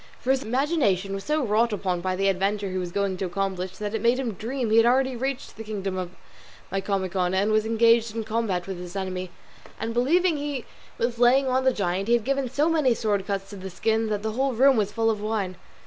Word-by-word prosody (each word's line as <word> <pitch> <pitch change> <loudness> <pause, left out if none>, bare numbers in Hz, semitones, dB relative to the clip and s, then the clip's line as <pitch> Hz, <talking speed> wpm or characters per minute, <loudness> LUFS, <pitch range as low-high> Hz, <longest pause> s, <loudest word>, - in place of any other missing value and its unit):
For 260 - 0
his 265 0 +2
imagination 245 - +1
was 195 0 -4
so 300 -2 0
wrought 225 +2 +2
upon 185 -4 -1
by 185 +1 -1
the 195 +1 +1
adventure 195 +1 0
he 185 - -2
was 180 -1 -4
going 200 0 -1
to 190 - -2
accomplish, 185 0 -3
that 210 0 -4
it 225 - -1
made 235 +2 +3
him 250 -5 -2
dream 235 +3 -3
he 220 - +5
had 230 - +6
already 260 +1 +2
reached 265 +2 -4
the 225 - -6
kingdom 200 -3 -4
of 185 -1 -3 0.6
Micomicon, 190 -2 -1
and 200 +3 +2
was 215 0 +2
engaged 230 0 +3
in 225 - -2
combat 215 -5 -1
with 190 -2 -5
his 180 +1 -8
enemy; 185 -1 -3 0.5
and 225 +1 -3
believing 320 +8 +2
he 285 -3 -4 0.3
was 235 0 -1
laying 260 +3 +5
on 260 0 +1
the 260 - +5
giant, 195 -3 -1
he 235 - +5
had 235 - 0
given 275 0 0
so 290 +5 +1
many 305 -7 +3
sword 205 -4 -1
cuts 195 -1 -2
to - - -7
the 190 0 -7
skins 220 +4 0
that 210 -1 -2
the 220 - -1
whole 265 +4 0
room 265 +3 +5
was 210 -3 0
full 225 +1 +1
of 210 -2 -4
wine. 210 -4 -2
215 Hz, 235 wpm, -25 LUFS, 195-250 Hz, 0.6 s, had